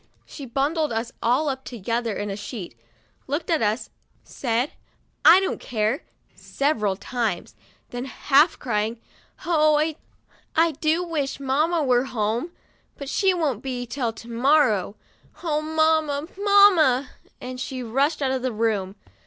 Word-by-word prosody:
'* - - -38
She 280 -3 -9
bundled 295 +5 0
us 230 +1 -2
all 255 +6 +2
up 265 -1 -3
together 230 -1 -3
in 205 - -3
the 195 - -3
sheet, 205 - -7 0.5
looked 295 +5 -2
at 325 - +2
us, 215 +2 -1 0.3
said, 245 +2 -2 0.3
" - - -42
I 345 +3 +9
don't 385 - -2
care," 220 +2 -1 0.3
several 220 -9 -1
times; 220 -3 -3 0.4
then, 245 +1 -4
half 285 +4 +3
crying, 220 -1 -2 0.5
"O, 310 -1 +3 0.6
I 330 +1 +4
do 315 +3 0
wish 295 -6 -3
mamma 305 +5 +1
were 250 -1 +2
home; 235 +6 -2 0.5
but 280 -1 -7
she 385 +5 +2
won't 305 - -1
be 250 -2 -4
till 240 -1 -2
to 230 - -12
morrow. 235 -4 +2 0.5
Oh, 305 -3 0
mamma, 315 -1 +1
mamma! 385 -10 +5
' - - -32
and 255 0 -5 0.3
rushed 285 +3 +1
out 265 - +1
of 260 -1 -1
the 255 0 -1
room. 210 -4 -1
270 Hz, 145 wpm, -24 LUFS, 230-310 Hz, 0.6 s, I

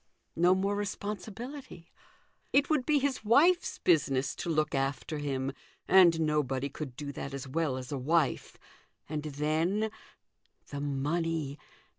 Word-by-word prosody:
No 175 +3 +4
more 195 +2 0
responsibility. 205 - -6 0.6
It 280 +3 +3
would 290 -5 +1
be 300 -1 +4
his 275 -3 -1
wife's 325 +11 +4
business 135 -5 +2
to - - -4
look 155 -2 +1
after 135 +3 -2
him, 135 -2 -2 0.4
and 175 -3 +6
nobody 140 -3 0
could 140 -3 -7
do 145 0 -5
that 140 0 -6
as 135 0 -6
well 145 -1 -1
as 130 +1 -7
a 140 - -2
wife. 155 +2 0 0.5
And 150 0 -3
then 160 +9 0 0.8
the 140 -1 -5
money. 145 +1 -1
155 Hz, 135 wpm, -30 LUFS, 140-200 Hz, 0.8 s, and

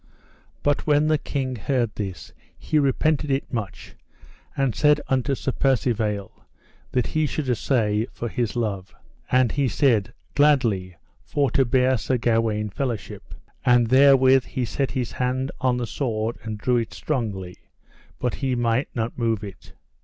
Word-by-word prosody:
But 145 +1 0
when 150 0 +4
the 155 -1 +2
king 130 -4 -3
heard 120 -1 -1
this 95 -6 -6 0.2
he 155 - 0
repented 150 +2 +1
it 135 0 -1
much, 110 -5 -5 0.6
and 135 -4 +1
said 150 +5 +4
unto 130 +1 +1
Sir 130 - -2
Percivale 110 -7 0 0.6
that 125 -2 +1
he 155 -1 0
should 145 -1 -3
assay, 115 -3 +1
for 120 - -5
his 120 0 -2
love. 100 -5 -3 0.4
And 125 -2 +4
he 140 -2 +1
said: 115 -3 +2 0.2
Gladly, 115 - +2 0.3
for 140 -4 0
to 135 - +3
bear 130 0 +2
Sir 130 +3 0
Gawaine 115 -3 0
fellowship. 120 -3 -5 0.3
And 120 -1 +4
therewith 130 0 +6
he 130 -2 -3
set 135 +4 -2
his 125 -3 -3
hand 130 +1 -1
on 130 -2 +2
the 120 - -2
sword 115 -2 -2
and 110 -1 -5
drew 125 +3 +1
it 115 -2 -3
strongly, 100 -11 -3 0.6
but 125 -2 -1
he 130 -2 -1
might 120 +2 +1
not 115 +1 -3
move 115 -3 0
it. 100 -2 -10
125 Hz, 155 wpm, -24 LUFS, 110-135 Hz, 0.6 s, therewith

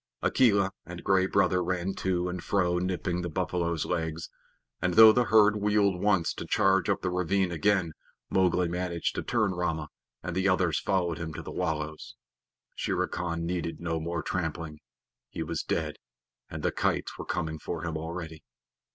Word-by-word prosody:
Akela 100 -6 +3
and 90 0 -9
Gray 95 -1 +3
Brother 90 -1 +2
ran 90 +1 -1
to 90 -1 0
and 90 -1 -4
fro 90 -3 +1
nipping 90 -1 -2
the 85 - -3
buffaloes' 85 -1 -1
legs, 80 -2 -3 0.5
and 90 -1 0
though 110 0 +10
the 125 +2 +2
herd 105 0 +5
wheeled 105 -3 +2
once 100 -5 +2
to - - -7
charge 95 -1 +3
up 100 - +1
the 90 - 0
ravine 90 +1 +1
again, 85 0 +1 0.3
Mowgli 90 -1 +2
managed 85 0 -2
to - - -3
turn 110 -5 +1
Rama, 80 -4 -2 0.3
and 85 - -4
the 95 +1 +2
others 90 -4 +2
followed 90 -4 0
him 80 -2 -5
to - - -6
the - - -7
wallows. 80 -1 -3 0.6
Shere - - -1
Khan 85 -1 -3
needed 85 -1 -3
no 80 -1 -2
more 85 +1 -3
trampling. 80 -3 -3 0.5
He - - -4
was - - -3
dead, - - -2 0.5
and - - -6
the - - +2
kites - - -1
were - - -5
coming 80 -3 -3
for 80 +2 -5
him 85 -1 -3
already. 80 0 -6
90 Hz, 170 wpm, -28 LUFS, 85-95 Hz, 0.6 s, though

